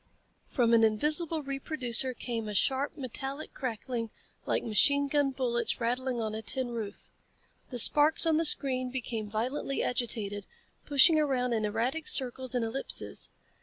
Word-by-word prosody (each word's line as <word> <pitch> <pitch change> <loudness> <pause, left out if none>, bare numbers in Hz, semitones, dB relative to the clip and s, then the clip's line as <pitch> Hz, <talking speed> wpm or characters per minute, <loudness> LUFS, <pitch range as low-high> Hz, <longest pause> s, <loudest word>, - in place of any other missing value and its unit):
From 235 -3 +1
an 230 -1 +5
invisible 300 +8 0
reproducer 265 -2 +1
came 230 -2 -5
a 210 - -6
sharp, 270 +7 +1
metallic 270 +2 -6
crackling 235 -2 -5 0.4
like - - -1
machine 280 +6 +3
gun 285 0 +1
bullets 250 -3 -2
rattling 250 +1 -2
on 220 -1 -3
a 220 - -5
tin 255 +2 -1
roof. 215 -3 -7 0.6
The 250 - -6
sparks 295 +7 +6
on 320 -1 +2
the 325 - +1
screen 255 -4 +2
became 235 -4 -5
violently 255 +6 -3
agitated, 210 -5 -2 0.4
pushing 300 +3 +6
around 255 -5 0
in 220 -2 -1
erratic 240 +9 -2
circles 260 -1 -2
and 240 -2 0
ellipses. 260 +5 0
255 Hz, 145 wpm, -29 LUFS, 230-275 Hz, 0.6 s, sparks